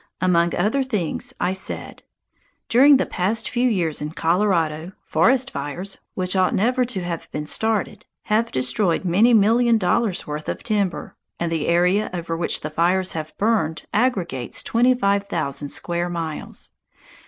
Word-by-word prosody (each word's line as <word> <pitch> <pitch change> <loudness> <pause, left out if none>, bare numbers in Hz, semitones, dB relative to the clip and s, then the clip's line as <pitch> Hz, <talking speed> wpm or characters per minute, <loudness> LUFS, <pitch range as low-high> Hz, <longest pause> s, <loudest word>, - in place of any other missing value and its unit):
Among 170 -2 +2
other 215 +10 +1
things 210 -11 -2
I 180 +1 0
said: 190 - -7 0.7
"During 275 +4 +7
the - - 0
past 200 +5 -1
few 250 +1 +1
years 170 -8 0
in 150 +1 -4
Colorado, 170 -2 0
forest 260 +1 +2
fires, 160 +8 -5 0.2
which 185 0 -1
ought 185 -1 +2
never 250 +5 +2
to 230 -7 -3
have 170 -2 -5
been 150 - -4
started, 220 +5 -1 0.2
have 220 +2 0
destroyed 165 +9 0
many 210 +7 +4
million 230 +3 +4
dollars' 210 0 0
worth 150 +1 -5
of - - -4
timber, 205 -5 -2 0.2
and 170 -1 -2
the 160 -3 -1
area 180 +5 +2
over 165 -1 -3
which 170 +1 -1
the 155 - -5
fires 180 +4 +1
have 155 -1 -6
burned 180 -8 0
aggregates 190 - -1
twenty 245 +2 +3
five 200 -3 +1
thousand 145 -4 -3
square 175 +3 -2
miles. 165 -3 -6
185 Hz, 155 wpm, -22 LUFS, 165-220 Hz, 0.7 s, During